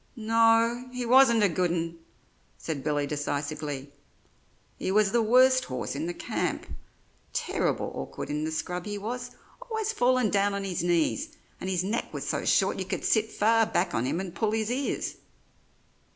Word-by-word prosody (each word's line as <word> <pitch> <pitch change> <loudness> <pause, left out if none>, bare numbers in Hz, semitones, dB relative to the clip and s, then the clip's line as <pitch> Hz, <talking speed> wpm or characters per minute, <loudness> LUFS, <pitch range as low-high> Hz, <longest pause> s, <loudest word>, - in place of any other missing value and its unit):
"No, 230 +2 +3
he 250 -1 -4
wasn't 235 -2 +6
a - - +6
good 180 0 0
un," 165 0 -2 0.6
said 150 -5 -4
Billy 145 -1 0
decisively, 145 -1 -4 0.9
"he - - -1
was 205 0 +3
the 235 +1 +3
worst 255 +3 +5
horse 130 +1 -4
in 155 +4 -3
the 175 - -3
camp. - - -2 0.7
Terrible - - -1
awkward - - -6
in 150 +1 -1
the 160 - -2
scrub 175 +4 -3
he 205 0 -3
was, 235 +5 -4 0.4
always 440 -1 -1
fallin' 250 - +2
down 200 0 +2
on 200 - -3
his 185 -4 -2
knees; 175 - 0 0.2
and 190 - -4
his 180 -2 0
neck 210 +5 -2
was - - -4
so - - -1
short - - +2
you - - -2
could - - -3
sit 220 0 +2
far 225 +1 +3
back - - 0
on 115 - 0
him 160 - -1
and 185 -3 -5
pull 215 +4 0
his 220 +1 0
ears." 270 +3 -2
205 Hz, 175 wpm, -27 LUFS, 165-235 Hz, 0.9 s, wasn't